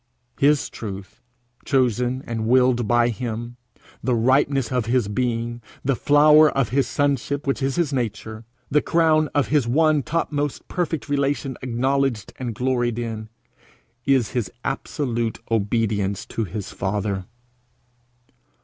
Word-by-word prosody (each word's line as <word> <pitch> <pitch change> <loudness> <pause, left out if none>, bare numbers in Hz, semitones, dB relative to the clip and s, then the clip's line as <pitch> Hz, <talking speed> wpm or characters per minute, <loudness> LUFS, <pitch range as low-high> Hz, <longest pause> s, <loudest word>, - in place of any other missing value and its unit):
His 145 0 +3
truth, 100 -3 -8 0.4
chosen 125 -1 +1
and 110 -1 -3
willed 125 -2 +3
by 120 +1 +3
him, 120 0 -5 0.5
the 125 +1 +1
ripeness 135 +2 +2
of 125 -3 0
his 120 -3 +2
being, 120 +2 -2 0.2
the 135 -1 +2
flower 150 +3 +6
of 135 -5 0
his 135 +3 +1
sonship 140 0 -1
which 140 0 -1
is 135 0 0
his 165 -5 0
nature, 110 -3 -3 0.3
the 150 +1 +4
crown 155 -2 +3
of 145 - +2
his 145 -5 +2
one 155 +3 +3
topmost 145 -1 -2
perfect 170 -4 -2
relation 140 -1 -1
acknowledged 130 -1 0
and 120 -4 -4
gloried 120 -1 0
in, 110 -2 -4 0.7
is 135 -4 +2
his 120 -7 -2
absolute 120 -4 -2
obedience 105 -2 0
to 115 - -3
his 100 +2 -6
father. 95 0 -2
125 Hz, 130 wpm, -23 LUFS, 115-140 Hz, 0.7 s, flower